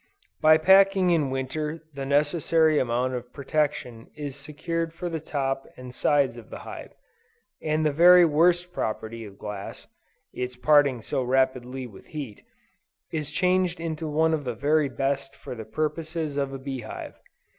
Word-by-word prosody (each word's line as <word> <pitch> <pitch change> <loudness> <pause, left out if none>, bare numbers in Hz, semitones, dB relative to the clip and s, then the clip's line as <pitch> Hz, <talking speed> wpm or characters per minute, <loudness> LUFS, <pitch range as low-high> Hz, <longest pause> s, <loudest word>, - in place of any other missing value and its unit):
By 155 0 +7
packing 190 +2 +5
in 155 -5 +2
winter, 150 +5 -3
the 135 -1 -5
necessary 155 +2 +3
amount 125 +1 0
of 125 -1 -6
protection 140 -5 -2
is 145 -3 -5
secured 160 +3 -4
for 175 +1 -4
the 165 -1 -3
top 135 -3 -2
and 125 -1 -9
sides 140 -4 +2
of 115 - -15
the - - -7
hive, - - -9 0.7
and 155 0 0
the 150 - +3
very 175 +4 +7
worst 175 +3 +2
property 110 -1 -4
of 100 -1 -12
glass, 100 -1 -7 0.5
(its 125 0 -4
parting 140 -3 +3
so 130 - -1
rapidly 130 0 0
with 105 -6 -13
heat,) 140 -9 -7 0.7
is 150 -2 -2
changed 180 +2 +1
into 160 -1 -4
one 160 +2 +2
of 155 -2 -1
the 125 -3 -3
very 145 +2 +2
best 135 0 -2
for - - -8
the 110 -3 -7
purposes 155 +1 -3
of 140 -1 -1
a 135 - -5
bee 135 0 -5
hive. 110 - -7
145 Hz, 160 wpm, -26 LUFS, 130-160 Hz, 0.7 s, By